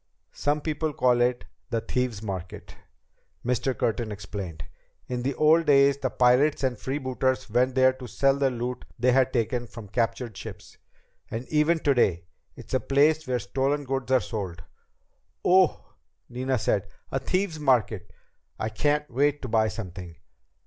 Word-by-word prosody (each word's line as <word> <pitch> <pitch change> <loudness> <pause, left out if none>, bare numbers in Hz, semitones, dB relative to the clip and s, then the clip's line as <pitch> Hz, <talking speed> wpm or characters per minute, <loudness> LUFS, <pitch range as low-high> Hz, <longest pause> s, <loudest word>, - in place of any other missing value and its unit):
"Some 145 +1 0
people 155 0 -2
call 125 -2 +3
it 120 0 +1 0.2
the 115 -2 0
Thieves' 115 -1 -2
Market," 95 -4 -6 0.7
Mr. 125 +1 0
Curtin 115 -1 -1
explained. 95 -5 -6 0.4
"In 125 -1 -3
the 135 +2 -1
old 160 +2 +4
days 140 -1 +5
the 130 - -1
pirates 125 +5 +3
and 130 -2 +1
freebooters 130 -1 -1
went 125 +3 +2
there 130 0 +5
to 130 -1 -9
sell 135 +3 +2
the 140 -1 +2
loot 125 0 -4
they 125 +2 +3
had 130 0 +3
taken 120 0 -1
from 115 -2 -10
captured 115 0 -1
ships. - - -10 0.5
And 115 +3 -5
even 155 +2 +3
today, 120 - +2 0.3
it's - - -11
a 130 - +3
place 150 +5 +2
where 125 -1 +1
stolen 135 +7 -1
goods 135 -1 -3
are 130 - +6
sold." 100 -6 -5 0.8
"Oh 185 0 +6
h!" - - -15 0.5
Nina 130 +2 -1
said. 105 -2 0 0.2
"A 135 - 0
Thieves' 185 0 -1
Market! 115 - +1 0.5
I 110 - -2
can't 150 +6 0
wait 145 +3 +1
to - - -3
buy 110 -1 +3
something!" 90 -5 -7
125 Hz, 155 wpm, -26 LUFS, 115-140 Hz, 0.8 s, are